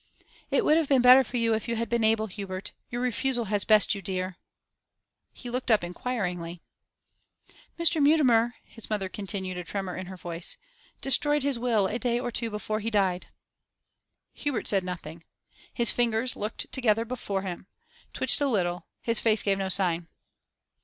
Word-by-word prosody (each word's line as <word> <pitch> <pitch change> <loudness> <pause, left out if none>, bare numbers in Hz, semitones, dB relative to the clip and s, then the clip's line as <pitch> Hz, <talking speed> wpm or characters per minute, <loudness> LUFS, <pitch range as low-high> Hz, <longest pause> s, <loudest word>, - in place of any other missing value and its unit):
'It 475 - +1
would 305 - +5
have 320 -4 0
been 265 -3 +4
better 255 +2 +9
for 245 0 -5
you 230 -1 +2
if 220 +2 -2
you 230 - -1
had 230 +1 -2
been 235 +1 0
able, 220 0 +3
Hubert. 195 -1 -6 0.2
Your 240 0 -3
refusal 245 0 0
has 205 -1 +2
best 215 -2 +5
you 200 - -5
dear.' 185 0 -3 1.0
He 245 - -11
looked 250 +1 -3
up 215 -5 +4
inquiringly. 180 -4 -4 1.2
'Mr. 335 -2 +3
Mutimer,' 250 -6 +4
his 225 - -9
mother 205 -3 -1
continued, 190 -2 -4
a - - -5
tremor 190 0 -4
in 185 -1 -6
her 190 0 -8
voice, 170 0 -5 0.4
'destroyed 290 +1 +2
his 275 -4 0
will 230 -5 +2
a 215 +5 -2
day 240 -1 0
or 245 -1 -3
two 230 0 -2
before 215 0 -3
he 220 +1 -2
died.' 190 -4 0 1.1
Hubert 285 -6 -3
said 195 -2 +2
nothing. 170 -2 -7 0.5
His 235 -2 +5
fingers, 240 +1 0
looked 210 +2 -4
together 230 -3 +2
before 205 -5 -3
him, 185 -1 -6 0.4
twitched - - +2
a 285 - +3
little; 180 -7 -1 0.2
his 230 -1 +1
face 220 -2 +2
gave 195 -1 +1
no 190 -1 -2
sign. 175 -3 +1
220 Hz, 175 wpm, -27 LUFS, 190-245 Hz, 1.2 s, better